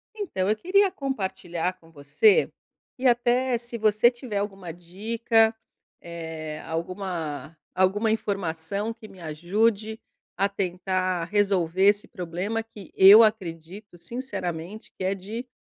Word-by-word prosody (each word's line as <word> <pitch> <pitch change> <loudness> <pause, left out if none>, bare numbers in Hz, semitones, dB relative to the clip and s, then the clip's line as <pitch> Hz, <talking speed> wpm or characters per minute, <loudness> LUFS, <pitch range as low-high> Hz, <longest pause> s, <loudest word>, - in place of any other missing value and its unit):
Então, 205 - -2
eu 215 - +3
queria 385 - +3
compartilhar 190 - -3
com 165 -1 -20
você, 165 - +3 0.5
e 260 +1 +1
até 245 +1 +2
se 235 0 -5
você 215 +2 +4
tiver 240 -4 -6
alguma 195 -4 -4
dica, 220 +6 +1 0.5
eh, 160 -2 -7
alguma 165 -3 -4 0.2
alguma 205 +4 +2
informação 200 0 -2
que 225 -1 -13
me 190 -3 -15
ajude 205 +7 0 0.4
a 195 +2 +1
tentar 185 -2 -1
resolver 190 -2 +1
esse 205 0 +3
problema, 180 +6 -3
que 220 -3 -13
eu 200 +4 +9
acredito 190 -2 -3
sinceramente, 190 -2 -6
que - - -5
é 190 +1 +1
de 215 +6 -7
195 Hz, 125 wpm, -25 LUFS, 175-225 Hz, 0.5 s, eu